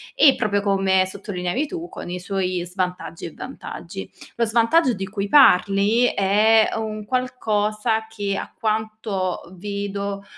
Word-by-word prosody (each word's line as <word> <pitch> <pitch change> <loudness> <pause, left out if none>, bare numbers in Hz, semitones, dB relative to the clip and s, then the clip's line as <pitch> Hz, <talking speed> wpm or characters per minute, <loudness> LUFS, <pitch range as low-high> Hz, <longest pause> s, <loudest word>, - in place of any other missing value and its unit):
E 295 - +7
proprio 205 -1 0
come 195 -2 +2
sottolineavi 195 +6 -3
tu, 345 +2 -6
con - - -8
i 180 0 -4
suoi 185 -2 -2
svantaggi 180 -2 -4
e 170 - -7
vantaggi. 260 - -8 0.3
Lo 235 - +1
svantaggio 240 +5 +3
di 195 -1 -4
cui 200 0 -3
parli 210 -2 +5
è 215 +2 +4
un 215 -1 -4
qualcosa 220 -3 -1
che, 205 -3 -3
a - - -6
quanto 215 -4 -2
vedo, 200 +1 -4
205 Hz, 135 wpm, -22 LUFS, 195-225 Hz, 0.3 s, E